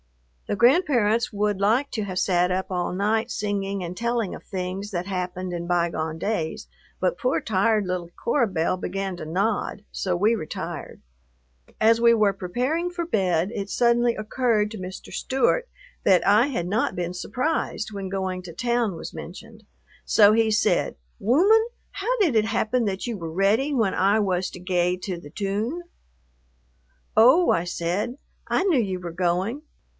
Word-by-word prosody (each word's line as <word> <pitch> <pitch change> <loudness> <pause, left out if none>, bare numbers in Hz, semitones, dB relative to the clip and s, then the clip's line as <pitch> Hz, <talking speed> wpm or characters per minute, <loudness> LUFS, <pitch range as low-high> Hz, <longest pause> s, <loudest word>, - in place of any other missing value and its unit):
The - - -1
grandparents 240 - +3
would 205 -1 -1
like 235 +8 +2
to 220 - -2
have 185 -2 -5
sat 180 -1 +2
up 190 +1 -2
all 180 -1 -1
night 215 +5 0
singing 200 -2 -2
and 175 +1 -5
telling 235 -1 -1
of - - -12
things 190 +2 -5
that 175 -2 -2
happened 185 -1 -4
in 170 0 -4
bygone 170 -2 0
days, 165 -3 -3 0.3
but - - 0
poor 255 0 +1
tired 210 0 +1
little 180 -2 -3
Cora 240 0 +2
Belle 175 -2 0
began 190 +1 -3
to 165 - -7
nod, 200 +4 -1
so 180 -2 -1
we 215 +5 +3
retired. 155 -8 -6 0.8
As 225 +1 +4
we 235 0 +6
were 210 -3 +3
preparing 250 - -1
for 350 -1 -4
bed 185 - +1
it 200 -1 -4
suddenly 240 +1 +3
occurred 215 -1 0
to 220 - -6
Mr. 185 0 -8
Stewart 470 - +1 0.3
that 185 -2 +4
I 210 +6 +5
had 175 -12 -2
not 210 +5 0
been 175 0 -2
surprised 250 - -2
when 195 -1 -5
going 190 -1 -3
to 175 -2 -10
town 235 0 0
was - - -7
mentioned, 220 +5 -10 0.4
so 210 -1 +5
he 225 0 +3
said, 215 - +1 0.2
"Wooman, 375 - +4 0.2
how 440 +6 -1
did 335 - +3
it 215 -1 +4
happen 230 +2 0
that 195 -1 -2
you 235 -3 -3
were 165 -3 -6
ready 205 - +2
when 220 -7 +1
I 200 +3 +3
was 185 -3 0
to - - -10
gae 180 0 0
to 185 -4 -3
the 145 -4 -11
toone?" 210 - -3 1.3
"Oh," 260 +11 +6
I 170 - +2
said, 180 +8 -2 0.3
"I - - +2
knew 340 -9 +3
you 190 -4 -2
were 175 -2 -7
going." 185 - 0
205 Hz, 170 wpm, -24 LUFS, 180-235 Hz, 1.3 s, we